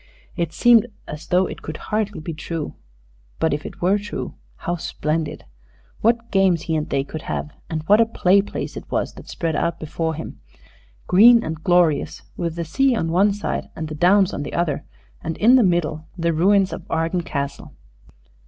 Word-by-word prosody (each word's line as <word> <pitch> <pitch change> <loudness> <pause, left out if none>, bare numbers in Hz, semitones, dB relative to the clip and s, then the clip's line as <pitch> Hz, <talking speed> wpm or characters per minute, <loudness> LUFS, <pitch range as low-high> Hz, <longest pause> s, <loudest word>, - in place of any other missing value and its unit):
It 170 -3 -1
seemed 240 +2 +5 0.2
as 150 +1 -8
though 180 +1 +3
it - - -7
could 155 - -6
hardly 210 -1 -2
be 160 +2 -5
true; 160 0 -5 0.6
but, 160 - +1
if 145 - -3
it - - -10
were 195 +3 +3
true, 205 +1 -5 0.2
how 175 - -3
splendid! 155 -1 -3 0.5
What 230 +1 +1
games 190 -4 +3
he 160 - -1
and 155 -1 -2
they 135 -1 +1
could 155 +2 -7
have! 150 - -4 0.2
And 155 -2 -3
what 210 +6 +5
a 225 - +3
play 200 -3 +3
place 200 - -6
it - - -8
was - - -1
that - - -13
spread 165 -2 -2
out 170 - -1
before 160 +1 -3
him 160 - -8 0.7
green 230 +5 +7
and 160 0 -5
glorious, 175 -5 +2
with 170 -2 -3
the 170 -1 -3
sea 265 - +2
on 165 -7 -1
one 195 +4 +4
side 205 +1 -3
and 160 -1 -5
the - - -5
downs 185 +5 +4
on - - -3
the 145 - -5
other, 155 -5 -1 0.4
and 160 0 -3
in 240 +4 +6
the 260 - +6
middle 165 -5 0
the 170 -1 +1
ruins 190 +4 +3
of - - -5
Arden 165 +2 0
Castle. 140 -4 -5
170 Hz, 190 wpm, -22 LUFS, 155-200 Hz, 0.7 s, green